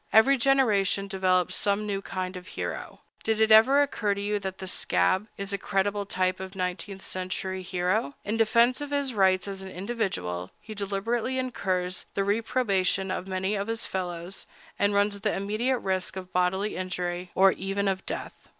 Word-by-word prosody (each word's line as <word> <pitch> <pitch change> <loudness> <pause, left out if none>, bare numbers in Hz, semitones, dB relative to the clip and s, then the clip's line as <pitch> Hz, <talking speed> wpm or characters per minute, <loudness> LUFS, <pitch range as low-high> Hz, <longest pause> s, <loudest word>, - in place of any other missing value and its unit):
Every 240 +6 +7
generation 225 -7 +3
develops 185 -2 +2
some 205 +1 0
new 200 -2 -2
kind 185 -1 -4
of 180 +1 -8
hero. - - -5 0.2
Did 220 -1 +1
it 220 0 +4
ever 260 +7 +7
occur 215 -7 0
to - - -5
you 205 +1 0
that 190 -1 -5
the 190 - -6
"scab" 185 - +1
is 200 0 -3
a 200 - -1
creditable 200 +1 0
type 185 -1 0
of 190 +1 -7
nineteenth 190 +1 -3
century 185 0 -3
hero? 180 -3 0
In 210 - -1
defense 235 +3 +4
of 290 - -4
his 285 -2 0
rights 190 -2 +3
as 195 -1 -5
an 190 - -7
individual, 180 - -3
he 215 - -9
deliberately 215 +5 -1
incurs 185 -8 -2
the 195 - +2
reprobation 200 -3 +1
of 185 - -3
many 190 +1 -1
of 200 0 -1
his 225 0 -2
fellows, 180 0 -4 0.3
and 205 0 +2
runs 205 0 +2
the 210 +1 0
immediate 215 +6 0
risk 190 -4 -2
of 185 -1 -7
bodily 185 +3 +1
injury, 180 -1 -3
or 195 0 +6
even 195 +1 -2
of 190 -1 0
death. - - -4
195 Hz, 175 wpm, -27 LUFS, 185-215 Hz, 0.3 s, Every